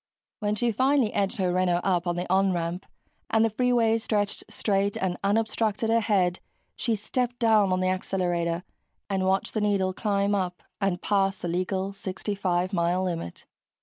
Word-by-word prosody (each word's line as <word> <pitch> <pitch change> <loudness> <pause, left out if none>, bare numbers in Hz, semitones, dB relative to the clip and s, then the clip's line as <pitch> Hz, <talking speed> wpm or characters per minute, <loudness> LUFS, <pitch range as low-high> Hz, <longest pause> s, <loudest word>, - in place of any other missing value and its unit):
When 210 0 0
she 235 +2 +1
finally 260 0 +2
edged 195 -1 0
her 185 -3 +1
Renault 180 -1 +2
up 180 -2 +1
on 175 - 0
the 175 +1 -3
"on" 190 +1 +3
ramp 170 +1 -3 0.4
and 225 0 +4
the 225 - 0
freeway 230 -1 +2
stretched 205 -2 -1
straight 200 -1 0
and 185 -2 -1
unobstructed 220 +1 +1
ahead, 205 -6 +2 0.4
she 230 -2 0
stepped 245 +4 -2
down 220 -5 +4
on 185 0 +1
the 185 - +2
accelerator 175 -2 -1 0.5
and 190 -1 +1
watched 190 0 0
the 215 - 0
needle 195 -3 +1
climb 200 0 0
up 180 -3 -2 0.2
and 195 -3 0
past 195 -1 +1
the - - -1
legal 185 +3 -1
65 190 -1 -2
mile 175 +1 +1
limit. 165 - -4
195 Hz, 165 wpm, -26 LUFS, 185-215 Hz, 0.5 s, and